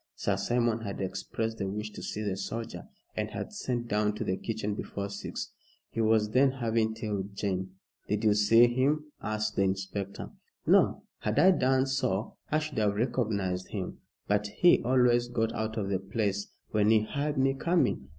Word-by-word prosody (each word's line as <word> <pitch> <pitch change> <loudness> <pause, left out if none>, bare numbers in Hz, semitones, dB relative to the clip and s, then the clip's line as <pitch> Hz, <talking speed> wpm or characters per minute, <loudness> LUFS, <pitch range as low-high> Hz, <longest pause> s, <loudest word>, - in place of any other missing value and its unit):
Sir 100 - 0
Simon 115 +3 +1
had 100 -3 -5
expressed 105 +4 -3
the 95 - -1
wish 105 +2 -4
to - - -9
see 105 - -4
the 100 -3 -1
soldier, 100 -1 -5 0.3
and - - -2
had - - -6
sent 120 -2 -2
down 105 -1 +1
to - - -3
the 95 - 0
kitchen 105 0 -3
before 100 0 -4
six. 100 0 -5 0.4
"He 115 - -1
was 110 -1 +3
then 130 +3 +4
having 115 -3 0
tea 110 -1 -4
with 100 0 -3
Jane." 95 -2 -2 0.3
"Did 105 +1 -1
you 105 -1 +5
see 105 +3 +6
him?" 140 +5 +1
asked 110 0 -2
the - - +3
inspector. 95 +1 -2 0.3
"No. - - +4 0.2
Had 105 +1 -2
I 190 +4 +7
done 130 -5 +3
so 120 -6 -1 0.2
I 155 - +4
should 155 -5 -2
have 105 -1 +2
recognized 100 -6 -1
him. 95 -4 -5 0.3
But 105 0 +1
he 175 - +4
always 120 -1 +3
got 115 -2 -1
out 110 +1 -3
of 100 -3 -1
the 95 -2 +1
place 100 0 -1 0.2
when 105 -1 +3
he 110 -1 +5
heard 145 +6 -2
me 135 0 +3
coming. 135 - +1
110 Hz, 185 wpm, -29 LUFS, 100-120 Hz, 0.4 s, I